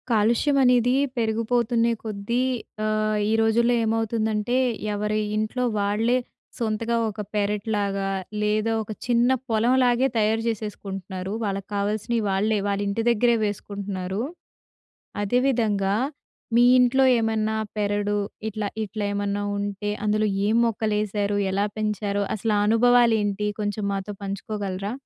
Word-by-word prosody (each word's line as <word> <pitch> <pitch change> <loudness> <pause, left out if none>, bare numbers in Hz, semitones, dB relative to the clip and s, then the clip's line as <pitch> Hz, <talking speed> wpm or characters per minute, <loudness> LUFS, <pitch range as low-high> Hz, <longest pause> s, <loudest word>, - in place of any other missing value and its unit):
కాలుష్యం 235 +6 +2
అనేది 245 -1 +4 0.2
పెరిగిపోతున్నే 230 +1 +1
కొద్దీ 220 +3 -2 0.4
ఆహ్, 215 0 +1
ఈ - - +2
రోజుల్లో 235 +2 +3
ఏమవుతుందంటే 220 0 0 0.4
ఎవరి 210 +1 -1 0.2
ఇంట్లో 215 +4 -1 0.2
వాళ్ళే 215 +5 +1 0.4
సొంతగా 230 0 -1
ఒక 210 - -9 0.2
పెరెటిలాగా, 205 -1 -1 0.3
లేదా 210 +1 +1
ఒక 215 - -8
చిన్న 240 0 +3 0.2
పొలంలాగే 245 +3 +3
తయారు 220 +1 +2
చేసేసుకుంటున్నారు. 195 -3 -4
వాళ్ళక్కావాల్సినయి 205 +3 -2
వాళ్ళే, 210 +3 +1
వాళ్ళింటి 200 +2 -1
దగ్గరే 235 +1 +3
వేసుకుంటున్నారు. 200 -1 -4 1.0
అదే 245 +5 +2
విధంగా 205 -6 +1 0.6
మీ 240 - +6 0.2
ఇంట్లో 250 +2 +4 0.2
ఏమన్నా 220 -1 0 0.2
పెరడు 205 0 0 0.3
ఇట్లా 215 -1 -3 0.2
ఇట్లేమన్నా 205 -1 -2
ఉంటే 205 0 -3
అందులో 215 +1 +2 0.2
ఏం 220 - +2
మొక్కలేశారు 210 -2 -1 0.2
ఎలా 200 +2 +1
పెంచారో 205 -1 -1
అసలు 220 +1 -1
ఆ - - +2
అనుభవాలేంటి 225 -3 +3 0.2
కొంచెం 205 0 -2
మాతో 195 +1 -3
పంచుకోగలరా? 200 0 -4
215 Hz, 110 wpm, -24 LUFS, 205-230 Hz, 1.0 s, మీ